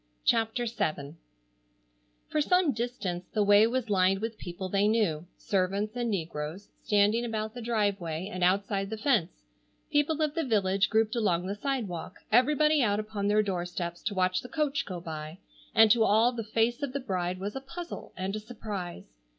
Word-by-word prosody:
CHAPTER 225 +1 +2
VII 155 -10 -2 1.1
For 305 - 0
some 360 0 +3
distance 215 -7 -3
the 210 - +3
way 205 +2 +6
was 245 0 -1
lined 190 0 +3
with 225 +1 -4
people 180 +2 -5
they 200 +2 +2
knew, 180 -8 +1
servants 200 +3 -1
and 240 -1 -1
negroes, 165 -1 -4
standing 210 +3 +3
about 220 -2 -3
the 245 - -7
driveway 200 -7 -1
and 185 0 -2
outside 195 +1 +1
the 220 - -4
fence, 215 - 0 0.5
people 295 +1 +2
of 300 -1 0
the 330 0 -1
village 200 -5 +2
grouped 220 0 +2
along 180 -6 +1
the 195 - -2
sidewalk, 210 - -3 0.2
everybody 300 +5 +4
out 205 -3 +2
upon 210 -2 -3
their 210 +1 +4
doorsteps 175 -2 -3
to 205 - -1
watch 185 0 +1
the 250 - -10
coach 300 -3 -1
go 185 -3 -5
by, 155 -1 -7 0.4
and 220 -1 +7
to 230 0 +5
all 220 +3 +4
the 235 -2 -4
face 225 +4 0
of 280 -3 -3
the 280 - -1
bride 185 -6 -2
was 200 +2 -4
a 270 - -4
puzzle 335 +6 -8
and 190 +2 -2
a - - -3
surprise. 205 - -7
210 Hz, 175 wpm, -29 LUFS, 185-240 Hz, 1.1 s, and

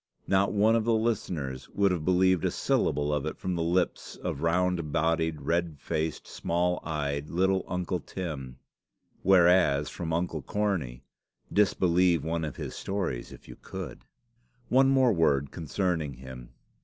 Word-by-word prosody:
Not 100 +1 +2
one 105 +2 +4
of 115 - +2
the 115 0 +2
listeners 90 - -2
would 100 -1 +2
have 85 -4 -1
believed 95 0 +3
a - - +2
syllable 75 0 0
of 75 0 -1
it - - -4
from 95 - -3
the 85 - -1
lips 85 +2 0
of 70 - -5
round 85 -1 +1
bodied, 80 0 0
red 85 -2 0
faced, 80 -2 -3
small 90 +1 -1
eyed, 75 -2 -3
little 95 +2 +1
Uncle 90 0 -2
Tim; 75 -9 -6 0.6
whereas 90 -6 +4
from 85 -2 -4
Uncle 80 -1 -1
Cornie 80 -10 -2 0.5
disbelieve 90 -4 +3
one 80 0 -2
of 75 -4 -4
his - - -6
stories 95 -11 -3
if - - -13
you - - -10
could! - - -8 0.7
One 135 +1 +5
word 130 -3 +4
more 75 -5 +3
concerning 80 -3 -2
him. 65 -1 -10
85 Hz, 150 wpm, -28 LUFS, 75-95 Hz, 0.7 s, One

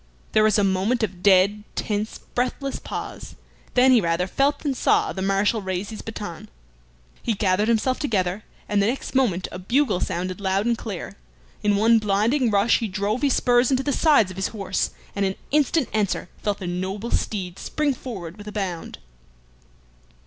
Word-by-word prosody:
There 215 - +4
was 215 -1 +4
a 205 - +3
moment 195 +5 +1
of 185 -4 -3
dead, 200 +2 +4
tense, 210 +1 -2 0.2
breathless 255 +2 -2
pause, - - -7 0.4
then 255 +1 +6
he 245 -3 +6
rather 170 0 +1
felt 275 +9 +1
than 285 -3 0
saw - - +2
the 190 - -5
Marshal 195 +3 +1
raise 190 +1 -3
his 215 - -7
baton. 205 -6 -7 0.7
He 225 - 0
gathered 195 +1 +1
himself 235 +3 +1
together, 200 - -1 0.2
and 205 -1 +2
the 200 - +2
next 255 +4 -3
moment 220 -10 +1
a 180 - -6
bugle 225 0 +1
sounded 185 +2 -3
loud 195 +1 +1
and 235 0 +2
clear. 210 -5 -6 0.4
In 205 -1 +2
one 225 +3 +5
blinding 220 +6 +2
rush 205 +2 +3
he 225 - -2
drove 205 +4 -1
his 280 -3 +3
spurs 245 0 +3
into 265 -1 +1
the 285 - 0
sides 280 - +4
of 185 - -10
his 190 - 0
horse, 195 -3 -2 0.3
and 200 - 0
in 190 -1 0 0.2
instant 295 0 +2
answer 205 -4 0
felt 205 -1 -1
the 190 - -7
noble 190 +6 -3
steed 185 -4 -2
spring 300 -2 0
forward 195 -9 -7
with 205 0 -11
a - - -5
bound. 190 -5 -4
210 Hz, 180 wpm, -23 LUFS, 190-240 Hz, 0.7 s, then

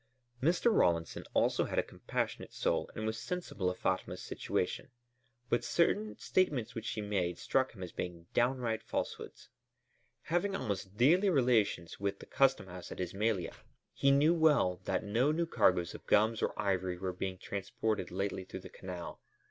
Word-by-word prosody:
Mr. 180 - +3
Rawlinson 85 -2 +2
also - - +3
had - - -4
a - - +4
compassionate - - -4
soul - - 0
and 110 - -3
was 110 +1 -2
sensible 140 - -2
of 90 - -4
Fatma's 95 0 -1
situation, - - -2 0.6
but 120 0 +1
certain 195 - +1
statements 150 -11 +1
which 115 0 -5
she 110 - -2
made 95 -4 -1
struck 130 -1 +1
him 95 -4 -8
as 90 - -6
being 85 -1 -5
downright 120 -2 +1
falsehoods. - - -5 0.7
Having 175 +4 0
almost 100 - -3
daily 175 - +5
relations 120 - +2
with 100 0 -1
the - - -11
custom 135 -6 +3
house 90 -1 -9
at - - -7
Ismailia, 95 +1 -1 0.4
he 140 - +3 0.2
well 160 - +4
knew 95 - -31
that - - 0
no 115 +8 +2
new 170 +2 +1
cargoes 90 - +2
of - - -11
gums 110 +2 +3
or - - -1
ivory 95 -3 0
were 95 0 -3
being 95 +1 -4
transported 100 +1 -2
lately 95 0 -2
through 95 0 -8
the - - -10
Canal. 90 -2 -7
105 Hz, 165 wpm, -33 LUFS, 95-130 Hz, 0.7 s, daily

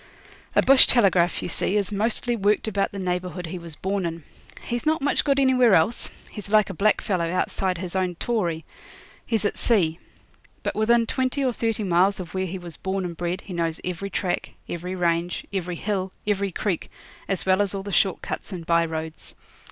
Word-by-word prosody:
A - - +5
bush 270 0 +7
telegraph, 185 -7 +3
you - - -2
see, 190 +3 +1
is 200 -1 -1
mostly 225 +3 +1
worked 210 0 +1
about 200 -2 0
the 200 - -7
neighbourhood 180 -1 -3
he 175 +2 -6
was 170 -2 -9
born 195 +3 -2
in. 165 -1 -6 0.4
He's 240 0 -3
not 315 +1 +2
much 285 +1 +1
good 280 -1 +2
anywhere 255 -5 +5
else. 165 +9 +2 0.2
He's 210 -2 -8
like 215 -2 +4
a - - -6
blackfellow 185 -3 +1
outside 185 0 0
of 180 - -6
his 180 0 -5
own 185 -2 0
'tauri'. 170 -6 -1 0.6
He's 225 -3 0
at - - -1
sea. 175 -8 +2 0.6
But - - -1
within 230 +2 +3
twenty 260 +3 0
or 250 - +1
thirty 225 -2 -1
miles 190 +2 +3
of 175 -3 -7
where 190 0 -1
he 185 +2 -4
was 175 -4 -8
born 190 0 -2
and 170 -1 -5
bred 175 +2 -3
he 190 - -9
knows 165 -2 -1
every 180 +2 -3
track, 185 -2 -2
every 180 +2 -4
range, 175 0 0
every 180 -2 -2
hill, 190 0 -2
every 200 -1 0
creek, 180 -1 -2 0.4
as 195 -2 -2
well 190 +1 +4
as 200 -1 0
all 195 - -4
the 200 - -6
short 190 0 +2
cuts - - -5
and 175 -3 -6
by 170 0 +3
roads. 160 -1 -5
190 Hz, 200 wpm, -24 LUFS, 175-210 Hz, 0.6 s, bush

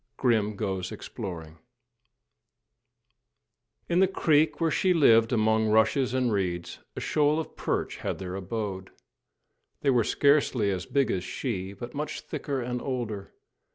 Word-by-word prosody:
III: - - -50
GRIM 110 -4 +1
GOES 95 -3 -3
EXPLORING 80 -4 -7 2.3
In 175 +1 +2
the 190 - +5
creek 160 -4 +2
where 165 -1 +1
she 185 +2 +2
lived 115 -7 +5
among 110 -1 +2
rushes 115 +4 +3
and 125 -2 +1
reeds, 90 -3 -2 0.2
a - - -4
shoal 150 +1 +2
of 160 - -6
perch - - -2
had - - -3
their 90 -1 -6
abode. 95 0 -4 0.9
They 140 - +3
were 120 -3 +3
scarcely 135 -6 +2
as 95 -1 -4
big 140 -2 +1
as 90 - -1
she, 95 -2 -4
but 120 +4 -8
much 150 +1 -4
thicker 140 -2 -4
and 125 0 -3
older. 115 -7 -4
115 Hz, 145 wpm, -27 LUFS, 95-140 Hz, 2.3 s, the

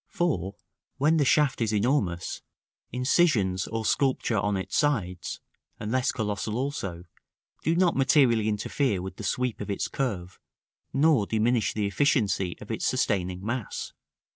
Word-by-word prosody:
For, 100 - -1 0.4
when 150 +4 +3
the 145 - +3
shaft 145 -1 +3
is 110 -2 +1
enormous, 105 -6 0 0.5
incisions 125 - +2
or 115 0 -3
sculpture 130 -5 +1
on 100 0 0
its 95 - -4
sides 100 - 0 0.4
(unless 125 +4 0
colossal 105 0 -2
also), 100 - -3 0.6
do 165 - +1
not 180 0 +3
materially 130 -5 +4
interfere 105 +1 0
with 95 +1 -7
the - - -7
sweep 125 +3 -1
of 105 - -5
its 100 - -1
curve, 95 -9 -3 0.5
nor 135 -6 +3
diminish 115 +1 +1
the 105 -1 0
efficiency 100 - +1
of - - -8
its - - -1
sustaining 90 -1 0
mass. 120 -1 -4
110 Hz, 140 wpm, -27 LUFS, 100-135 Hz, 0.6 s, materially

